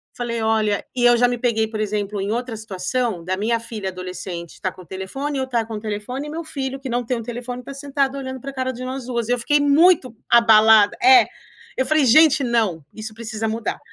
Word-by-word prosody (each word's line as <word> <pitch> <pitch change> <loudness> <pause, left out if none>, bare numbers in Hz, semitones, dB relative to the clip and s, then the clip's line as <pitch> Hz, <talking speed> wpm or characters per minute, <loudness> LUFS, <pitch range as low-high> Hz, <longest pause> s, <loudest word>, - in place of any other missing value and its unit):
Falei 235 -2 -3
olha 215 -2 +1
e 245 - 0
eu 240 0 +6
já 245 +1 +4
me 245 - -2
peguei, 225 -2 0
por 215 -1 -4
exemplo, 205 -1 -2
em 200 +2 -2
outra 240 0 -3
situação, 215 0 -3
da 185 +2 -2
minha 230 +4 0
filha 220 -4 -5
adolescente 180 -2 -7
estar 185 -2 -4
com 185 - -14
o - - -20
telefone, 270 - -5
eu 265 - 0
estar 240 -3 -1
com 220 -1 -6
telefone, 220 +7 -5
e - - -7
meu 330 0 -5
filho 270 -3 -4
que 270 - -7
não 245 0 -1
tem 245 +1 -1
um 230 - -6
telefone 245 +1 -6
estar 275 +3 -9
sentado 275 -1 -2
olhando 260 -1 -6
pra 275 +2 -7
cara 260 -1 -2
de 255 0 -7
nós 260 0 -5
duas. 235 -2 -2
Eu 245 - +1
fiquei 290 +5 +2
muito 290 -3 +4
abalada 220 -2 +6
é, 385 -1 +7 0.5
eu 260 - 0
falei: 310 -2 +3
"Gente, 305 +3 +6
não! 220 - 0
Isso 215 0 -7
precisa 225 -1 -4
mudar. 220 -1 -3
235 Hz, 225 wpm, -21 LUFS, 215-260 Hz, 0.5 s, é